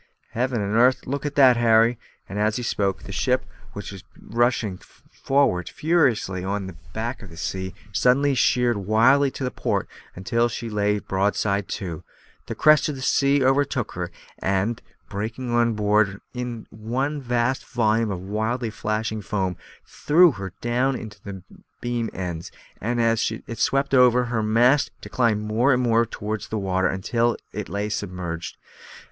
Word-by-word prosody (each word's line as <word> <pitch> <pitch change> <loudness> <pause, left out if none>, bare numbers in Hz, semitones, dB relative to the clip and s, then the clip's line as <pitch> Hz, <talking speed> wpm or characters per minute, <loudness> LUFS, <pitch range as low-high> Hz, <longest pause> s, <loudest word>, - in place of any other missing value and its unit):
Heaven 125 -1 -1
and 100 +2 -2
'arth! 125 +3 +4
look 140 +2 -3
at 145 - -6
that, 130 -4 +6
Harry." 115 0 +4 0.3
As 105 +2 0
he 125 - -3
spoke, 100 -4 -1
the - - -8
ship, 130 +5 0 0.3
which 100 - -7
was 95 -1 -10 0.2
rushing 115 -5 0
forward 135 -10 -1
furiously 125 - +1
on 100 +1 -2
the 95 -2 -8 0.2
back 115 +4 -4
of 105 - -11
a 80 - -12
sea, 95 +2 -4 0.2
suddenly 135 +6 +3
sheered 120 -2 +2
wildly 115 +8 +4
to 130 -1 -4
port, - - -1 0.3
until 115 +6 0
she 115 0 -5
lay 105 0 +1
broadside 100 0 0
to; 85 -5 -5 0.4
the - - -4
crest 155 -1 +5
of 150 - -3
the 130 - -7
sea 140 0 +3
overtook 135 -3 +1
her, 90 -1 -4 0.3
and, 100 +5 0 0.3
breaking 115 +5 -4
on 120 -1 +3
board 105 0 +3
her 100 +1 -11
in 125 -2 -5
one 130 +7 -2
vast 125 +1 0
volume 115 -2 +1
of 95 -3 -4
wildly 110 +4 -2
flashing 110 0 -2
foam, 95 -2 -2 0.3
threw 170 +3 +4
her 95 -5 -6
down 125 +3 +1
upon 105 -5 -8
her - - -18 0.2
beam 120 -2 -2
ends, 85 -3 -5 0.3
and, 120 +3 -1
as 115 -1 +2 0.2
it 115 - -7
swept 135 0 +1
over 125 -1 +5
her, 120 -1 -2
her - - +1
mast 120 +6 +3
declined 115 -4 0
more 110 +6 +2
and 125 -1 +2
more 115 -1 +3
towards 105 +1 -5
the 110 - -3
water, 95 -2 +1
until 115 +5 0 0.2
it - - -5
lay 100 +1 -2
submerged. 90 -5 -5
115 Hz, 165 wpm, -24 LUFS, 100-125 Hz, 0.4 s, that